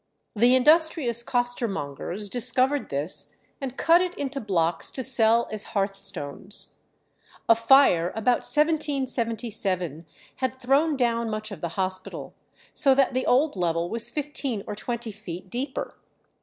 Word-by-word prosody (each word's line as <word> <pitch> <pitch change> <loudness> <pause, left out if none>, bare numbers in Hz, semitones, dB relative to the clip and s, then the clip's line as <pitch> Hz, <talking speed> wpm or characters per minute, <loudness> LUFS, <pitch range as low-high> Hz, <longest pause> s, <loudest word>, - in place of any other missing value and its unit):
The 240 +4 +5
industrious 295 -3 +4
costermongers 210 - -2
discovered 255 +5 0
this, 145 +5 -2 0.3
and 265 -1 -5
cut 335 +2 +4
it 365 -1 -2
into 275 0 -4
blocks 170 -5 0
to 260 - -4
sell 235 -2 +4
as 215 +1 -7
hearthstones. 195 -2 -3 0.8
A - - +8
fire 230 -7 +4
about 235 +3 +2
1777 230 - 0 0.3
had 260 0 -3
thrown 280 +4 +2
down 235 -2 0
much 215 0 -5
of 200 - -8
the 170 - -3
hospital, 185 0 -3 0.4
so 270 -2 +5
that 270 -1 +2
the 255 +1 -1
old 280 +3 +3
level 170 -1 -1
was 230 +1 0
fifteen 275 -6 -3
or 210 - -5
twenty 235 +1 -4
feet 185 -3 -9
deeper. 265 +3 -4
235 Hz, 130 wpm, -25 LUFS, 195-265 Hz, 0.8 s, A